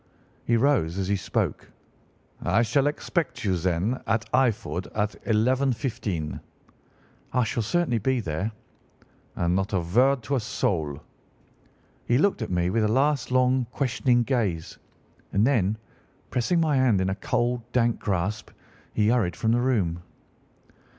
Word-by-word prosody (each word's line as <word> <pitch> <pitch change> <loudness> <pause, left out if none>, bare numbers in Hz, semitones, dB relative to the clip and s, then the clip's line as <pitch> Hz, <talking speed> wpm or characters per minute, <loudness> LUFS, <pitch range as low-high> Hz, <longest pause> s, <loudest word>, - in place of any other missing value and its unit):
He 115 - +3
rose 115 - +2
as 95 -1 -1
he 100 - +2
spoke. 95 - -2 0.7
'I 105 +7 +3
shall 135 +5 +2
expect 155 +2 -2
you, 95 -3 +1
then, 90 +7 -1
at 110 +2 +1
Eyford 115 -7 +1
at 105 0 0
11:15.' 115 - 0 0.9
"'I 125 - +3
shall 115 +1 -1
certainly 125 +1 +1
be 130 +4 +1
there.' 95 +2 -2 0.8
"'And 85 +1 +1
not 95 +2 -1
a 95 - +3
word 125 +10 +2
to 140 +6 -1
a - - +1
soul.' 80 -9 -2 1.0
He 120 - +3
looked 190 0 +2
at 110 - -3
me 90 0 0
with 110 +2 +1
a - - +3
last 140 +5 +1
long, 130 -1 +3
questioning 125 -2 +1
gaze, 105 -11 -2 0.5
and 100 +3 +3
then, 110 -6 +2 0.5
pressing 130 +8 +1
my 155 -4 +2
hand 125 -7 +3
in 95 - 0
a - - 0
cold, 120 0 0
dank 120 -2 +1
grasp, 100 +2 -2 0.5
he 105 0 +3
hurried 110 -8 +1
from 110 +4 0
the 120 +1 +2
room. 95 -10 0
115 Hz, 145 wpm, -26 LUFS, 95-130 Hz, 1.0 s, He